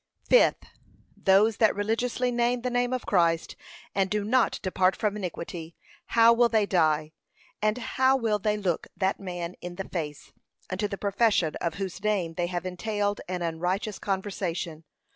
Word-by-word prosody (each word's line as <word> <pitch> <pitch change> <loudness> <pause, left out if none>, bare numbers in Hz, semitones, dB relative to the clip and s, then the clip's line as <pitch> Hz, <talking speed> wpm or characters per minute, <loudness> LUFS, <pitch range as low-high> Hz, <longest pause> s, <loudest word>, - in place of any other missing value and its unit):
Fifth, - - +4 0.5
Those 200 +3 +4
that 220 - +4
religiously 235 +4 0
name 240 0 +1
the 250 - -1
name 245 0 +1
of 255 -2 -2
Christ, 170 -4 +1 0.4
and 195 -1 +1
do 210 0 0
not 235 +3 +2
depart 185 0 +2
from 210 -1 -1
iniquity, 170 -3 -6 0.3
how 230 0 +6
will 235 0 +4
they 220 -3 +3
die; 155 -5 +2 0.5
and 215 +2 +1
how 260 +2 +2
will 220 -4 0
they 210 +1 0
look 185 -5 -1
that 190 0 0
man 175 -3 -5
in 175 0 -6
the 195 +1 -5
face, 150 -5 -5 0.4
unto 200 +3 -1
the 200 - -5
profession 200 -5 +1
of 170 -2 -2
whose 190 0 -5
name 195 -6 0
they 175 +1 -1
have 175 0 -4
entailed 205 +2 -2
an 180 -1 -3
unrighteous 180 +5 -2
conversation? 185 -5 -3
200 Hz, 160 wpm, -27 LUFS, 175-220 Hz, 0.5 s, how